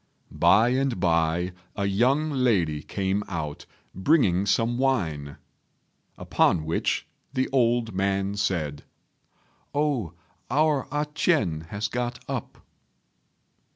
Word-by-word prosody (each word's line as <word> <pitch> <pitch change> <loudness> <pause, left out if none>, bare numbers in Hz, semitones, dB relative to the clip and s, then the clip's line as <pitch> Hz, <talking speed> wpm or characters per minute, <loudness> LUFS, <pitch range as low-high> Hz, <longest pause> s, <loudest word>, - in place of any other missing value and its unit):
By 100 +7 +4
and 130 -4 0
by 85 0 +1 0.2
a 100 - -1
young 130 +10 +2
lady 100 - +1
came 100 +3 -2
out, 80 -5 -5 0.3
bringing 100 - +2
some 115 +5 +1
wine; 80 - -1 0.8
upon 80 -3 +2
which 80 - -1 0.3
the 130 -1 +1
old 120 -3 +2
man 100 +1 0
said, 80 -8 -2 0.9
"Oh, 140 - 0 0.4
our 145 +1 +2
A 150 +1 0
ch'ien 90 - +1
has 105 +3 -3
got 120 +1 -3
up." - - -6
100 Hz, 105 wpm, -26 LUFS, 85-130 Hz, 0.9 s, By